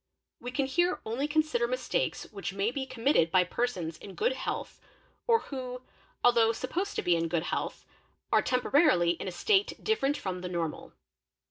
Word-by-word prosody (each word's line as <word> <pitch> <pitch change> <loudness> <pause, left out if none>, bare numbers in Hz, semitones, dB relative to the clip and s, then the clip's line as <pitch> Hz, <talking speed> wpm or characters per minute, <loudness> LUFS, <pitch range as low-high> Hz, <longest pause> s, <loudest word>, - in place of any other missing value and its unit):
We 245 - -6
can 265 +2 0
here 350 +7 +1
only 245 +6 -1
consider 310 +11 +1
mistakes - - -1
which 195 -2 -5
may 200 +3 0
be 265 +1 -4
committed 245 - +2
by 180 +2 +4
persons 180 -5 -2
in 195 - -10
good 475 +4 +2
health - - -4 0.5
or 460 -1 +4
who, 255 -2 -6 0.4
although 235 -2 +5
supposed 365 - -3
to - - -1
be 175 - +3
in 165 0 0
good 165 -1 0
health, - - -3 0.5
are - - +5
temporarily 250 - +3
— - - -23
in - - -4
a - - -2
state 390 - +2
different 290 -10 +1
from 185 -1 -4
the 180 - -4
normal. 170 -3 -4
250 Hz, 175 wpm, -29 LUFS, 185-310 Hz, 0.5 s, although